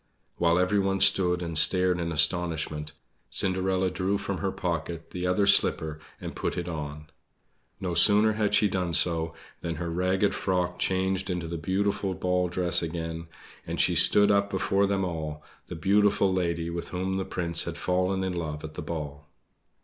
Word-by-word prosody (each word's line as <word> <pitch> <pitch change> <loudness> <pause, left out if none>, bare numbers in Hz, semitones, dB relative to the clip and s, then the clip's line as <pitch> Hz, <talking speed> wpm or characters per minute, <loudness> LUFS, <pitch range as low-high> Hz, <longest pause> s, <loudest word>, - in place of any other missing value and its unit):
While 85 0 +2
everyone 95 +1 +1
stood 90 -3 +4
and 85 -1 -5
stared 90 +3 +4
in 85 -1 -3
astonishment, 80 -1 +1 0.4
Cinderella 95 0 0
drew 95 +2 -1
from - - -4
her - - -1
pocket 85 -1 -4
the 90 0 -3
other 90 +2 +2
slipper 80 -5 +3 0.2
and - - -7
put - - -3
it 90 0 -3
on. 75 -2 -7 0.7
No 90 -2 -3
sooner 105 +4 +5
had 105 -1 0
she 105 - +4
done 90 -3 -2
so 80 -1 +1 0.2
than 85 -1 -4
her 85 -1 -4
ragged 95 +3 0
frock 90 -2 -2
changed 95 0 -1
into 90 -2 -3
the 85 - -5
beautiful 95 +2 -1
ball 90 0 0
dress 90 0 0
again, 80 0 -5 0.4
and - - -4
she - - +3
stood 105 0 +6
up 100 0 +2
before 100 0 +1
them 95 -1 0
all 80 -3 -5 0.2
the 90 - -7
beautiful 100 +2 +2
lady 85 -2 -2
with 85 0 -5
whom 95 +1 -3
the 95 - -1
Prince 85 -2 -2
had - - -5
fallen 90 +1 0
in 95 -1 -2
love 80 -3 -5
at 80 0 -8
the - - -6
ball. 75 -2 -7
90 Hz, 170 wpm, -27 LUFS, 85-95 Hz, 0.7 s, stood